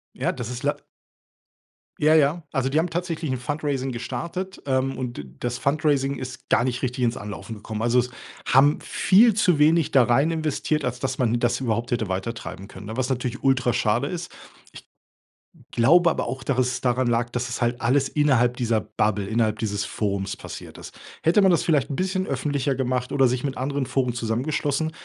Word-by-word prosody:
Ja, - - 0
das 125 -2 -6
ist 125 0 -6
lei - - +1 1.2
Ja, 155 +1 +5
ja. 155 +3 +3
Also, 135 -2 0
die 150 +3 +2
haben 170 +2 0
tatsächlich 165 -2 -3
‘n 130 - -1
Fundraising 140 0 -2
gestartet, 135 - -5
ähm, 135 0 0
und 125 -2 -4
d - - -5 0.2
das 120 0 -2
Fundraising 140 -1 +1
ist 130 -1 -8
gar 120 - +3
nicht 125 0 -2
richtig 125 0 -2
ins 120 0 +1
Anlaufen 105 +2 -7
gekommen. 105 +1 -6
Also, 120 +2 +3
es 125 +1 0 0.4
haben 140 +3 +5
viel 215 +4 +4
zu 180 -7 +2
wenig 160 +1 +4
da 130 -3 +6
rein 135 +8 +3
investiert, 155 -1 -1
als 125 0 -3
dass 130 -1 -2
man 120 -2 +2
das 120 +1 +1
überhaupt 115 -1 -2
hätte 115 -3 0
weitertreiben 95 0 -5
können, 100 0 -11
ne, 110 - -6
was 130 0 0
natürlich 125 -1 -3
ultra 125 -3 +2
schade 115 +5 +1
ist. 175 +2 -5 0.4
Ich - - -14 0.8
glaube 170 +9 +5
aber - - -2
auch, 130 +2 -5
dass 130 -1 -1
es 125 0 0
daran 125 0 +1
lag, 120 0 +1
dass 125 +1 -3
es 120 - -4
halt 120 +1 0
alles 135 +3 +2
innerhalb 125 -5 +2
dieser 115 -3 +1
Bubble, 105 -2 -1
innerhalb 110 -1 0
dieses 100 -3 -2
Forums, 100 -2 -2
passiert - - -9
ist. - - -11 0.3
Hätte 170 +6 +4
man 190 -1 +5
das 170 - +2
vielleicht 145 -5 +1
‘n - - -2
bisschen 190 +3 -1
öffentlicher 140 0 -1
gemacht 125 -1 -1
oder 135 -2 +4
sich 125 +1 -1
mit 135 -2 -2
anderen 140 +1 -1
Foren 125 -2 0
zusammengeschlossen, 140 +6 -1
130 Hz, 195 wpm, -24 LUFS, 120-145 Hz, 1.2 s, da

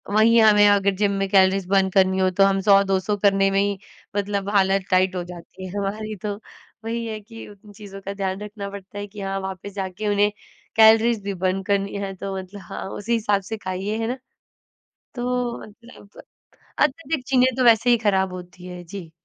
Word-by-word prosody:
वही 230 +2 +5
हमें 210 -2 +6
अगर 200 -1 +3
जिम 200 +1 +1
में 195 0 -1
कैलोरीज़ 190 -1 +3
बर्न 195 -1 +3
करनी 190 0 +3
हो, 185 0 +3
तो 195 +2 +3
हम 195 0 +1
100-200 195 0 +3
करने 195 -1 +3
में 195 - +2
ही 200 -1 -1 0.4
मतलब 200 -1 -2
हालत 195 -1 +3
टाइट 185 0 +3
हो 180 - -2
जाती 175 +1 -11
है - - -9
हमारी 215 +2 -3
तो। 205 -1 -3 0.5
वही 230 +1 -3
है 215 -1 -5
कि 225 +2 -11
उन 205 0 -16
चीज़ों 200 -1 -10
का 195 +1 -5
ध्यान 195 -1 -3
रखना 205 -1 -7
पड़ता 200 0 -10
है 205 - -5
कि 205 0 -10
हाँ, 195 0 -3
वापस 190 +1 -7
जाके 195 +1 -4
उन्हें 205 0 +2 0.4
कैलोरीज़ 225 0 +5
भी 200 0 -3
बर्न 185 +1 -1
करनी 200 +1 -1
है 195 0 -4
तो 195 +1 -5
मतलब 190 +2 -9
हाँ, 170 - -7
उसी 210 +4 -3
हिसाब 210 -3 +1
से 220 +4 -6
खाइए 195 +2 -4
है 225 - -1
ना? 250 +2 -3 1.0
तो 245 -1 -2
मतलब 215 -1 -15 0.6
अत्यधिक 295 0 0
चीने 255 -1 +4
तो 255 - +2
वैसे 235 +1 +5
ही 240 - +5
खराब 190 -4 +1
होती 180 0 -10
है, 180 -1 -8
जी। 175 -2 -9
200 Hz, 195 wpm, -22 LUFS, 190-215 Hz, 1.0 s, हमें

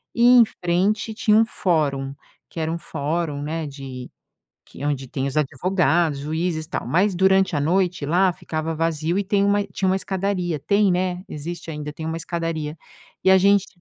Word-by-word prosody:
e 235 - +2 0.2
em - - +9 0.2
frente 195 +6 +1
tinha 215 0 +3
um 225 - +5
fórum, 145 -10 0 0.4
que - - -7
era 160 0 -1
um 170 - -3
fórum, 150 0 -3
né, 160 +1 -3
de 135 -3 -8 0.6
que 140 - -9
onde 140 -2 -1
tem 135 -1 -3
os 140 - -6
advogados, 160 +1 +1
juízes 160 +3 -2
e - - -32
tal. - - -3
Mas, 190 +4 +2
durante 190 0 +3
à - - 0
noite, 180 +1 +1
lá 180 +4 +3
ficava 160 -1 -4
vazio 165 +1 -1
e - - +1
tem 200 +1 +2
uma 205 0 +3
tinha 190 -1 -2
uma 185 - +3
escadaria 190 -4 -2
tem, 200 +7 +2
né, 180 0 -1
existe 165 +3 -6
ainda, 150 -1 -5
tem 160 +1 -7
uma 160 0 -2
escadaria 165 -2 -3 0.5
e 190 - +5
a 190 - +8
gente 200 +1 +4
170 Hz, 185 wpm, -22 LUFS, 150-190 Hz, 0.6 s, em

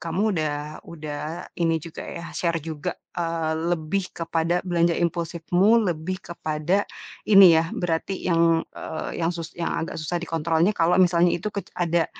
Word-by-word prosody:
kamu 170 +4 -2
udah 150 0 -3
udah, 155 +1 -6
ini 165 -2 +1
juga 165 +1 -8
ya 170 - -7
share 170 -2 0
juga, 155 -1 -4 0.2
eee, 165 -2 -1 0.2
lebih 175 +4 -3
kepada 165 +1 0
belanja 170 -1 +2
impulsifmu 175 +6 +2
lebih 175 +3 -3
kepada, 170 +3 -1 0.4
ini 195 -5 +9
ya, 165 - +2
berarti 175 +2 -2
yang, 165 -1 +4 0.2
eee, 160 - -5
yang 165 +1 +1
sus 165 -1 -6
yang 170 - -1
agak 165 - -4
susah 170 +3 -2
dikontrol 165 -1 0
nih 205 +4 +3
kalau 170 +2 +3
misalnya 175 -1 +4
itu 185 +5 -2
kec 200 - -4
ada 170 -2 +1
170 Hz, 155 wpm, -24 LUFS, 160-175 Hz, 0.4 s, ini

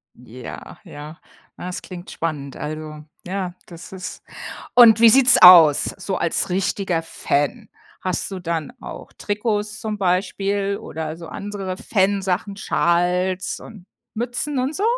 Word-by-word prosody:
Ja, 125 0 -10
ja. 150 +2 -10 0.4
Na, - - -7
das 180 - -5
klingt 180 -1 -10
spannend, 145 -4 -4
also 155 0 -6 0.2
ja, 185 -1 -4
das 170 -1 -12
ist 190 0 -8 0.5
und 230 -3 +7
wie 230 0 +8
sieht's 260 +2 +6
aus 170 -5 +9
so 190 0 -3
als 170 - -1
richtiger 185 -1 -1
Fan? 165 - -2 0.3
Hast 185 +1 -2
du 190 - -5
dann 170 +4 -4
auch - - -10
Trikots 210 0 -3
zum 215 -1 -4
Beispiel 195 +2 0
oder 160 0 -6
so 165 -1 -10
andere 195 0 -6
Fan 195 0 +1
Sachen, 195 +1 -2
Schals 180 +1 0
und 205 -6 -13 0.3
Mützen 245 +5 -3
und 265 +4 -2
so? 395 - -3
185 Hz, 140 wpm, -21 LUFS, 170-205 Hz, 0.5 s, aus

